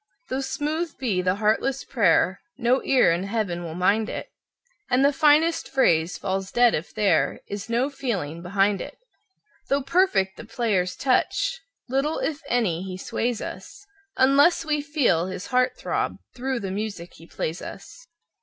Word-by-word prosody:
Though 260 +1 -1
smooth 305 +4 -3
be 215 -9 0
the 185 +1 +1
heartless 220 +6 0
prayer, 200 -5 +2 0.2
no 255 +1 +2
ear 260 -10 +4
in 170 +1 0
Heaven 200 -5 -2
will 165 -1 -6
mind 205 +5 +2
it, - - -6 0.6
And 255 +2 +3
the 285 - +4
finest 310 +3 +3
phrase 170 -10 +2
falls 190 0 -3
dead 240 -1 +4
if 155 - -3
there 200 -6 +1
is 205 +2 -6
no 240 +3 +1
feeling 195 - -3
behind 195 +2 +1
it. 290 - -8 0.7
Though 275 0 +1
perfect 275 - +2
the - - -8
player's 215 -6 -1
touch, 380 - 0 0.3
little, 275 +5 0
if 310 -1 -2
any, 215 -10 +1
he 185 -1 -6
sways 235 +4 -2
us, - - -9 0.3
Unless 280 +6 +4
we 300 -1 0
feel 270 - +1
his 190 0 -6
heart 255 0 +1
throb - - -2 0.2
through 260 0 -3
the 195 -1 -4
music 200 -4 -5
he 165 - -15
plays 165 +1 -4
us. - - -10
230 Hz, 160 wpm, -24 LUFS, 190-275 Hz, 0.7 s, ear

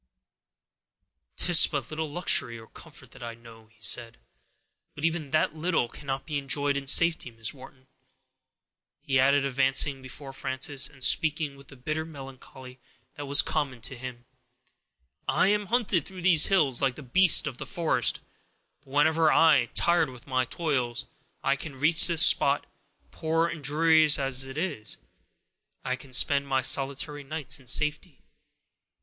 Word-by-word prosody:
"'Tis 175 -3 +6
but 140 -3 -5
little 155 0 -4
luxury 145 -7 0
or 110 - -13
comfort 130 -1 -17
that - - -16
I 115 -1 -7
know," 115 -1 -17
he 110 0 -31
said, 115 0 -1 0.8
"but 145 - -4
even 165 -3 -2
that 155 +1 0
little 165 -5 -1
cannot 135 +2 -7
be 150 -3 -3
enjoyed 140 +1 0
in 140 -1 -5
safety! 165 -2 +3
Miss 115 +1 -5
Wharton," 130 -1 -16 1.2
he 135 -4 0
added, 140 +1 +2
advancing 135 +1 +1
before 135 +1 -10
Frances, 135 +1 -1
and 140 -3 -15
speaking 150 +1 +1
with 140 0 -18
the 135 - -14
bitter 155 +5 -4
melancholy 135 -3 -13 0.3
that 145 -1 -9
was 140 +1 +5
common 135 -5 -3
to 130 +4 -5
him, 120 -1 -10 1.0
"I 190 - +2
am 205 0 -1
hunted 215 - 0
through 185 0 -11
these 170 -4 +5
hills 145 -10 +2
like 135 -3 -1
a 150 - -10
beast 175 +7 +3
of 135 -5 -6
the - - -7
forest; 170 -4 -1 0.6
but 145 - -34
whenever, 160 +3 +2 0.5
tired 170 -3 +2
with 125 -2 -14
my 130 -2 -1
toils, 130 -4 -3 0.4
I 140 - +1
can 140 -1 -10
reach 155 +3 +3
this 170 -3 +5
spot, - - +2 0.5
poor 165 +1 -1
and 165 -3 -6
dreary 160 +2 +3
as 135 -1 +1
it 135 +1 -10
is, 155 -11 -4 0.9
I 130 - -1
can 130 +1 -15
spend 140 +2 +1
my 135 -1 -1
solitary 140 +2 0
nights 140 -1 +1
in 130 - -15
safety. 150 +3 +1
140 Hz, 155 wpm, -26 LUFS, 130-160 Hz, 1.2 s, Tis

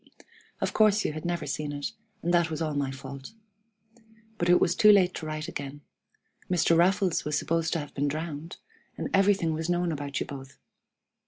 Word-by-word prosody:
Of - - -1
course 215 -1 +4
you - - 0
had 155 +2 -7
never 175 0 -2
seen 145 +2 -3
it, 145 0 -4 0.3
and 175 +1 +1
that 170 -2 +3
was 155 - -4
all 155 -2 -1
my 140 -2 -1
fault. 135 +4 -8 1.1
But 175 - +1
it 175 - +6
was 170 - +3
too 210 +2 +7
late 185 -3 +5
to 155 - -6
write 155 +1 -4
again. 145 -3 -6 0.7
Mr. 170 -2 +3
Raffles 180 +1 +3
was 150 -1 -1
supposed 165 +1 0
to 165 - 0
have 145 - -10
been 145 +1 0
drowned, 155 +2 -5 0.4
and - - -4
everything 195 -4 +3
was 160 +2 -3
known 175 -1 +1
about 145 -2 -3
you - - -2
both. 135 -1 -9
160 Hz, 190 wpm, -28 LUFS, 145-175 Hz, 1.1 s, too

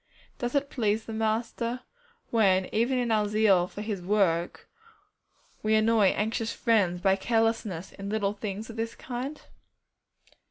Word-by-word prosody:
Does 245 +1 -2
it 280 0 0
please 220 -2 0
the 225 - -6
Master 230 +2 -1 0.5
when 190 -5 +3
even 240 +4 +2
in 245 -2 0
our 210 -1 +2
zeal 205 -4 +3
for 205 - -7
His 210 -4 -3
work 175 -3 0 0.9
we 215 0 +2
annoy 220 -1 +4
anxious 220 +3 0
friends 200 -7 +1
by 190 0 +4
carelessness 225 -4 0
in 195 0 -7
little 205 -1 0
things 210 +1 -5
of 225 - -12
this 225 0 -3
kind? 260 +4 -5
220 Hz, 145 wpm, -28 LUFS, 200-230 Hz, 0.9 s, annoy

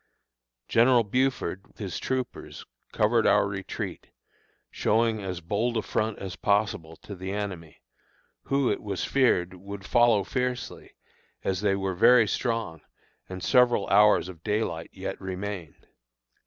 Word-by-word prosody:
General 120 +1 +4
Buford, 125 -5 -1
with - - -29
his 100 -4 -5
troopers, 130 -1 -4 0.3
covered - - +2
our - - +4
retreat, 100 -1 -6 0.6
showing 110 -1 +1
as 90 -2 -5
bold 110 +7 -1
a 110 - -1
front 110 -1 -1
as 95 -2 -6
possible 100 -6 0
to 100 - -11
the 95 0 -6
enemy, 95 -6 -6 0.6
who, 140 -2 +1
it - - -2
was 100 -3 -3
feared, 95 -10 +2
would 100 +2 -9
follow 120 -3 +4
fiercely, 125 +3 -4 0.5
as 95 -1 -1
they 100 -2 +2
were 95 -1 -2
very 115 +5 +5
strong 115 - -2 0.5
and 95 -1 -7
several 120 -5 +3
hours 105 -2 +5
of 90 -4 -10
daylight 105 -6 -2
yet - - -6
remained. 95 -3 -6
100 Hz, 135 wpm, -27 LUFS, 95-115 Hz, 0.6 s, very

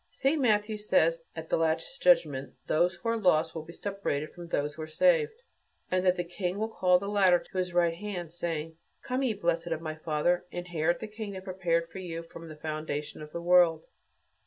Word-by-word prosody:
St. 285 +3 +1
Matthew 215 -3 +2
says 165 -5 +2 0.2
that 160 - -4
at 160 - -20
the - - +4
Last 165 +9 -1
Judgment 145 - +3
those 175 +3 +2
who 200 +7 -4
are 230 - +1
lost 165 -6 +3
will 160 - -4
be 160 +2 -11
separated 170 -6 -3
from 175 -1 -9
those 150 -3 -1
who 155 - -8
are 155 - -5
saved, 465 - +2 0.5
and 185 0 +2
that 180 -1 +4
the 175 - -1
King 180 +2 -3
will 220 +1 -1
call 180 -4 +4
the 200 +2 -5
latter 195 -3 +5
to 185 - -10
his 180 -1 -1
right 175 -1 +3
hand, 175 -3 -5
saying, 165 -2 -4 0.3
"Come, 255 +1 -1
ye 245 -5 +1
blessed 170 -3 0
of 165 -2 -1
my 160 -1 -4
Father, 155 +3 0
inherit 175 -2 -1
the 220 - -4
kingdom 210 -3 -6
prepared 175 -3 0
for 190 - -9
you 170 -2 -5
from 165 0 -11
the 155 - -9
foundation 155 -1 -4
of 150 0 -9
the 170 - -5
world. 175 -2 +5
175 Hz, 210 wpm, -29 LUFS, 160-200 Hz, 0.5 s, latter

